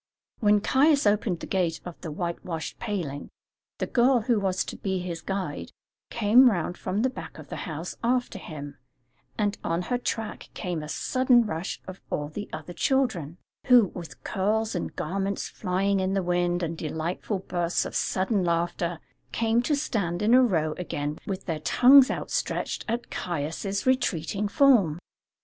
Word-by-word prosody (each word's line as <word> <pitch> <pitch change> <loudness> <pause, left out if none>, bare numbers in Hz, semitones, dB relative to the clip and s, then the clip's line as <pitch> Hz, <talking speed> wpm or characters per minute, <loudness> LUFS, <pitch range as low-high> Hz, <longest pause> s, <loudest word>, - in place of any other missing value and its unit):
When 210 -2 +4
Caius 280 +4 +4
opened 205 -4 +1
the - - -4
gate 175 -4 0
of 175 -2 -9
the 165 - -5
whitewashed 170 0 -4
paling, 170 -11 -4 0.5
the - - -1
girl 250 0 +3
who 235 -1 +2
was 190 -2 0
to - - -6
be 190 -1 -2
his 175 -2 -4
guide 195 0 -4 0.4
came 235 +3 +6
round 175 -4 -1
from 195 +5 -2
the 260 - +3
back 255 - -9
of - - -11
the - - -5
house 160 +3 -5
after 245 -4 0
him, 145 -5 -8 0.6
and 205 -1 0
on 165 +2 -1
her 245 - +1
track 225 -3 -4
came 175 -5 -3
a 150 - -7
sudden 250 - +3
rush 165 -2 -4
of 185 0 -9
all 145 0 -2
the 205 +6 -6
other 175 - -7
children, 185 - 0 0.3
who, 245 -6 +6
with 170 -2 -9
curls 215 +3 0
and 175 - -4
garments 195 +4 -2
flying 195 +1 0
in 190 +1 0
the 195 - +1
wind 175 0 +1
and 165 0 -3
delightful 165 +6 -3
bursts 175 -2 -1
of - - -6
sudden 190 +1 0
laughter, 170 0 0 0.3
came 230 +1 +2
to 295 +5 +1
stand 205 - -1
in 220 +3 +4
a 255 - +8
row 160 -10 +2
again 150 -4 -3
with 195 -1 -4
their 165 -4 -2
tongues 260 - +7
outstretched - - -2
at 235 +1 -3
Caius' 175 +5 -3
retreating 205 -6 +1
form. 205 - +4
190 Hz, 165 wpm, -26 LUFS, 170-225 Hz, 0.6 s, a